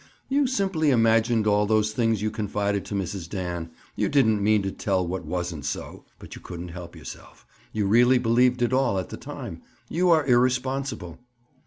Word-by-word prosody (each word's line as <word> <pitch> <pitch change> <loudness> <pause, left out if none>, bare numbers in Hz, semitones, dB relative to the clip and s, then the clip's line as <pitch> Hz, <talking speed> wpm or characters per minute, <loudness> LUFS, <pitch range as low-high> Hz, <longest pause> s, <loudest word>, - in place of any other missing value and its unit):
"You 280 0 +2
simply 190 - +1
imagined 115 -2 +3
all 105 0 +3
those 110 0 +2
things 115 -2 0
you 110 - 0
confided 100 -2 -2
to 105 - -5
Mrs. 95 -2 -4
Dan. 90 -3 -4 0.3
You - - 0
didn't 110 -7 +3
mean 105 -1 +3
to 95 - -2
tell 95 -2 -1
what 95 +2 -4
wasn't 90 -4 -3
so, 70 - -5
but - - -11
you - - -10
couldn't 90 0 -7
help 85 0 -9
yourself. - - -11 0.3
You 105 -2 -1
really 120 +5 +5
believed 125 +1 +3
it 120 - +1
all, 130 -6 +2
at 95 - -3
the - - -7
time. - - -8 0.3
You 180 +2 +1
are 160 -4 +4
irresponsible." 130 - 0
110 Hz, 180 wpm, -25 LUFS, 95-125 Hz, 0.3 s, really